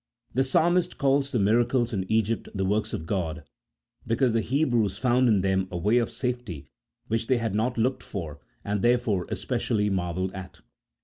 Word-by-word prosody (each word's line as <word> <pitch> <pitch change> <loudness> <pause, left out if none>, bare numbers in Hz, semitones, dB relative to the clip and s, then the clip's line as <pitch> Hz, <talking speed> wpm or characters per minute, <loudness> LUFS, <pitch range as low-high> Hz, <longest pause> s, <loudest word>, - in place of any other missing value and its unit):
The 130 - +2
Psalmist 175 +6 +2
calls 140 0 +2
the 125 - -1
miracles 120 +3 +2
in 95 -1 -3
Egypt 110 0 0
the 95 -1 0
works 105 +3 0
of 80 - -4
God, 85 -4 -2 0.6
because 115 +1 +2
the 115 - +2
Hebrews 120 -5 +1
found 125 0 +3
in 105 -4 +3
them 95 0 +1
a 90 - -4
way 105 +8 +3
of 120 - -1
safety 120 - -4 0.4
which 115 +1 -1
they 130 - +3
had 115 -3 -2
not 120 +4 0
looked 125 +3 +1
for, 80 -7 -6 0.3
and 100 -1 -1
therefore 120 -6 +2
especially 105 -2 -1
marvelled 95 0 -2
at. 95 -1 -9
110 Hz, 175 wpm, -26 LUFS, 95-125 Hz, 0.6 s, found